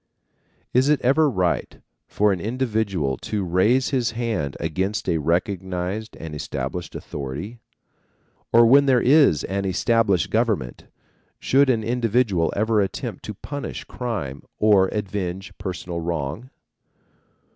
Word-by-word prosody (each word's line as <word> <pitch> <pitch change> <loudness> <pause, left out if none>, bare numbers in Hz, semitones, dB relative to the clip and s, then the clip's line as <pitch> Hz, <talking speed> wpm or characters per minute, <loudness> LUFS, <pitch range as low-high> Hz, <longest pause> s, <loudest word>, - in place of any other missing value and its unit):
Is 130 +3 +3
it 150 -2 +4
ever 145 +5 +4
right, 90 -8 -1 0.3
for 105 0 +2
an 90 - -4
individual 105 - -1
to 105 -2 -3
raise 100 +9 +2
his 125 -5 0
hand 110 - -2
against 95 +6 -2
a 85 -3 +1
recognized 90 +5 -2
and 80 -1 -7
established 75 - -5
authority? 75 - -6 0.9
Or, 115 0 +7
when 140 +4 +6
there 130 -2 +5
is 135 - +4
an 100 +1 -2
established 100 0 +1
government, 110 - -1 0.5
should 135 +1 +3
an 115 -4 +2
individual 115 -6 +1
ever 110 +1 +2
attempt 95 -1 -4
to 105 - -6
punish 145 +7 -6
crime 95 - -5 0.2
or 105 -3 +4
avenge 95 -1 -4
personal 90 -2 -4
wrong? 85 - -4
105 Hz, 125 wpm, -23 LUFS, 90-120 Hz, 0.9 s, Or